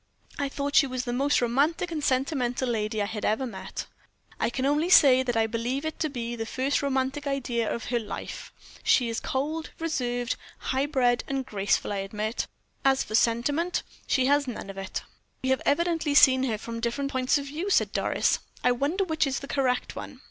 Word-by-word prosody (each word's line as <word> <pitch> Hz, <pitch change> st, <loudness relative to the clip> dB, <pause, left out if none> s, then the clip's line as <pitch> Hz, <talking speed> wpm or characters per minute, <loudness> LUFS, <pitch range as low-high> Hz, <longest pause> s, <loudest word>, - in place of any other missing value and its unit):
I 280 Hz, -1 st, 0 dB
thought 285 Hz, +1 st, -3 dB
she 280 Hz, -, +6 dB
was 255 Hz, -1 st, -3 dB
the 240 Hz, -, -2 dB
most 275 Hz, +3 st, +2 dB
romantic 295 Hz, +9 st, +1 dB
and 305 Hz, -3 st, -3 dB
sentimental 260 Hz, -2 st, 0 dB
lady 215 Hz, -2 st, -1 dB
I -, -, 0 dB
had 210 Hz, 0 st, -5 dB
ever 220 Hz, +5 st, +1 dB
met." 220 Hz, -6 st, -6 dB, 0.5 s
"I -, -, +1 dB
can 255 Hz, +2 st, -2 dB
only 295 Hz, +5 st, +2 dB
say 270 Hz, -7 st, +7 dB
that 245 Hz, -3 st, -1 dB
I 225 Hz, -, +4 dB
believe 240 Hz, +6 st, -2 dB
it 315 Hz, -, -4 dB
to 310 Hz, -, 0 dB
be 240 Hz, -3 st, -4 dB
the 225 Hz, -, -3 dB
first 265 Hz, +4 st, 0 dB
romantic 275 Hz, +1 st, -1 dB
idea 245 Hz, -5 st, -1 dB
of 235 Hz, -, -4 dB
her 240 Hz, -, +3 dB
life. 220 Hz, -, -7 dB, 0.3 s
She 245 Hz, -3 st, +3 dB
is 230 Hz, -, -2 dB
cold, 310 Hz, +5 st, -2 dB
reserved, 245 Hz, -7 st, -1 dB, 0.2 s
high 265 Hz, +2 st, -1 dB
bred, 250 Hz, -4 st, +2 dB
and 270 Hz, -1 st, -2 dB
graceful, 200 Hz, -2 st, 0 dB
I -, -, -2 dB
admit; 210 Hz, +3 st, -3 dB, 0.3 s
but 270 Hz, -, +4 dB
as 270 Hz, 0 st, +2 dB
for 215 Hz, -, -9 dB
sentiment, 265 Hz, +10 st, +1 dB, 0.2 s
she 260 Hz, -2 st, +2 dB
has 285 Hz, +1 st, +3 dB
none 215 Hz, -5 st, -5 dB
of 195 Hz, -, -14 dB
it." 195 Hz, -1 st, -4 dB, 0.4 s
"We 260 Hz, -, 0 dB
have 265 Hz, -, +2 dB
evidently 325 Hz, -1 st, +1 dB
seen 260 Hz, -1 st, +7 dB
her 225 Hz, -4 st, -1 dB
from 230 Hz, +2 st, -6 dB
different 260 Hz, +4 st, -2 dB
points 260 Hz, +2 st, +2 dB
of 280 Hz, -, -4 dB
view," 315 Hz, +8 st, -4 dB
said -, -, +3 dB
Doris. -, -, +1 dB, 0.2 s
"I 250 Hz, -, +4 dB
wonder 285 Hz, +10 st, 0 dB
which 315 Hz, -5 st, +1 dB
is 270 Hz, -, -1 dB
the 275 Hz, -, -7 dB
correct 260 Hz, -3 st, 0 dB
one." -, -, -8 dB
260 Hz, 205 wpm, -27 LUFS, 235-285 Hz, 0.5 s, say